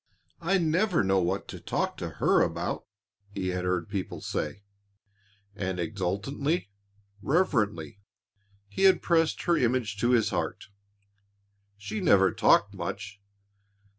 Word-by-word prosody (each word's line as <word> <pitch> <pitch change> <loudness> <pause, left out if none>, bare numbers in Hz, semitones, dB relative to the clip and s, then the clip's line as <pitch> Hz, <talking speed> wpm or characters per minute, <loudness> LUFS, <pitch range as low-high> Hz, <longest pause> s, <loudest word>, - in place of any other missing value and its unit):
I 180 +4 +2
never 175 - +2
know 95 0 +2
what 85 - -1
to - - -7
talk - - -2
to - - -4
her - - +3
about," - - -2 0.4
he 95 -2 -3
had 90 0 -2
heard 90 -2 -1
people 100 -2 -4
say, 100 - -4 0.9
and 95 -2 -3
exultantly, 105 - -2 0.5
reverently, 105 - 0 0.7
he 100 - 0
had 190 -3 +5
pressed 165 -2 +2
her 175 - +3
image 120 -5 0
to 120 +4 +1
his 120 -3 +3
heart. - - -3 1.1
She 205 - -5
never 100 - +5
talked - - +3
much. 100 0 -6
105 Hz, 125 wpm, -28 LUFS, 95-160 Hz, 1.1 s, had